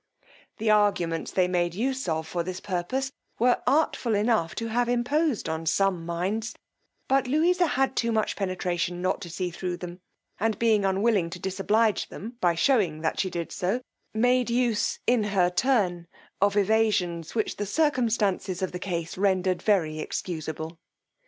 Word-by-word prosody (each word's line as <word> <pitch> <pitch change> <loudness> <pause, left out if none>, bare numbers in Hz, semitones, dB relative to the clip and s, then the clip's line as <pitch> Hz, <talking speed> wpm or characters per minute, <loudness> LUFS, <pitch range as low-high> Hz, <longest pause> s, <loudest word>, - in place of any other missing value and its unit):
The 220 -1 +1
arguments 195 -6 +2
they 185 -1 +2
made 175 -1 0
use 260 -1 -1
of 160 0 -1
for 170 +1 -2
this 185 +2 -5
purpose 205 +9 -2 0.3
were 245 +1 +3
artful 260 -5 +2
enough 210 -5 +1
to 230 0 -3
have 240 +2 +1
imposed 245 - +1
on 160 0 -3
some 180 0 +1
minds, 195 +7 -2 0.5
but 270 -1 +2
Louisa 345 +6 +3
had 270 -2 0
too 230 0 +1
much 220 -1 0
penetration 180 -2 -2
not 185 +2 0
to 175 - -7
see 180 +2 -3
thro' 180 +1 -3
them; 175 0 -8 0.4
and 220 +1 0
being 220 -3 +3
unwilling 195 -2 +2
to 175 +1 -7
disoblige 205 +4 +1
them 230 +5 -8
by 175 -2 +3
shewing 180 - +2
that 160 - -1
she 190 - +1
did 170 -2 -4
so, 195 +8 -1 0.3
made 245 +2 +2
use, 235 -3 +1
in 240 -3 +3
her 190 -3 +2
turn, 180 -6 +1 0.3
of 200 +1 +3
evasions 205 -5 +1
which 220 - -1
the 205 - -3
circumstances 220 - +1
of 185 - -1
the 180 - -5
case 175 -2 -4
rendered 185 -2 +1
very 160 -7 +1
excusable. 160 0 -5
195 Hz, 160 wpm, -26 LUFS, 175-230 Hz, 0.5 s, were